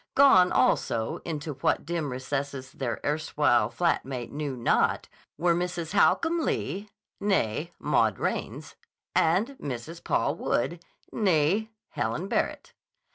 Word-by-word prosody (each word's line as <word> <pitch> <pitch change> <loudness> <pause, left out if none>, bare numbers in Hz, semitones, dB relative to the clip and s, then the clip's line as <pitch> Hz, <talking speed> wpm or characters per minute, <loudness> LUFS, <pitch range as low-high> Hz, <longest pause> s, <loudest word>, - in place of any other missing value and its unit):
Gone 190 -10 +7
also, 110 -1 +1
into 155 -2 -4
what 135 - 0
dim 165 -2 -2
recesses 135 +1 -4
their 125 -4 -3
erstwhile 145 -6 +2
flat 175 -1 +1
mate 125 -3 -6
knew 145 -3 -4
not, 120 - +1 0.3
were 170 +2 +3
Mrs. 175 -1 -3
Holcomb 330 +11 +3
Lee, 210 - -2 0.3
née 170 - 0
Maud - - +2
Raines, - - -3 0.4
and 180 +9 +3
Mrs. 145 +6 -6
Paul - - +1
Wood, 170 +7 -1 0.3
née 195 +1 +2 0.2
Helen 120 +10 -2
Barrett. - - -2
155 Hz, 120 wpm, -27 LUFS, 135-180 Hz, 0.4 s, Gone